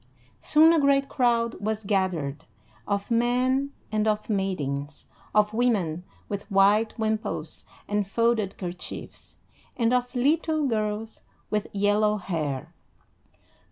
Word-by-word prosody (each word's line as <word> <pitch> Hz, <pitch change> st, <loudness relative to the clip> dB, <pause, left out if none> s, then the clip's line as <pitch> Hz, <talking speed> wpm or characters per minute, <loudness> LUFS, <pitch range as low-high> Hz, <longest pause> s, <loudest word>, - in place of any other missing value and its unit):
Soon 320 Hz, +2 st, +5 dB
a 330 Hz, -, +4 dB
great 275 Hz, -1 st, +3 dB
crowd 235 Hz, -3 st, +2 dB
was 220 Hz, +1 st, -2 dB
gathered, 185 Hz, -8 st, -1 dB, 0.4 s
of 200 Hz, +3 st, -2 dB
men 250 Hz, +4 st, +2 dB, 0.2 s
and 215 Hz, 0 st, +1 dB
of 215 Hz, +1 st, 0 dB
maidens, 150 Hz, -8 st, -2 dB, 0.3 s
of 210 Hz, 0 st, +3 dB
women 200 Hz, -9 st, +1 dB, 0.2 s
with 200 Hz, +1 st, -5 dB
white 205 Hz, +3 st, +3 dB
wimples 220 Hz, -1 st, -3 dB, 0.2 s
and 205 Hz, -1 st, 0 dB
folded 225 Hz, -2 st, +1 dB
kerchiefs, 180 Hz, -1 st, -8 dB, 0.4 s
and 235 Hz, 0 st, +2 dB
of 250 Hz, +1 st, 0 dB
little 310 Hz, +4 st, +2 dB
girls 215 Hz, -2 st, -2 dB, 0.3 s
with 210 Hz, -1 st, 0 dB
yellow 205 Hz, +1 st, +2 dB
hair. 155 Hz, -9 st, -3 dB
215 Hz, 115 wpm, -26 LUFS, 195-240 Hz, 0.4 s, Soon